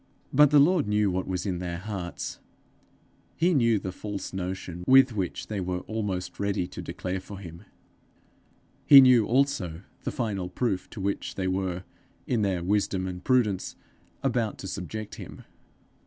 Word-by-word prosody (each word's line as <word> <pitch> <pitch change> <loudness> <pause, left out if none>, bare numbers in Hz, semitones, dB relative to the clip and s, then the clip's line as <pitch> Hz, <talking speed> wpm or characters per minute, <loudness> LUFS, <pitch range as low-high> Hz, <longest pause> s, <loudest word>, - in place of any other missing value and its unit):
But 150 +1 +7
the 150 - +5
Lord 155 - +4
knew 105 -1 +2
what 95 +1 -2
was 90 -2 -2
in 90 -3 -2
their 85 -1 -4
hearts; 90 -2 -5 1.0
he 175 +3 +2
knew 115 -6 +3
the 95 -1 -4
false 100 +1 -6
notion 90 -1 -5
with 130 -1 +7
which 95 -4 -3
they 105 -3 -3
were 90 0 -2
almost 95 -5 -4
ready 100 -3 0
to - - -7
declare 95 +1 -4
for 100 +2 -10
him; 85 0 -10 1.2
he 140 - +11
knew 125 -5 +6
also 115 - 0 0.2
the - - -2
final 100 -7 -2
proof 95 -1 -2
to 110 - -9
which 100 +1 -2
they 95 -1 -2
were 95 -1 -2 0.4
in 120 -4 0
their 95 -4 0
wisdom 95 -1 0
and 90 -1 -6
prudence 115 -8 +1 0.5
about 120 -5 0
to 95 - -7
subject 105 +4 -6
him. - - -10
100 Hz, 160 wpm, -27 LUFS, 90-115 Hz, 1.2 s, he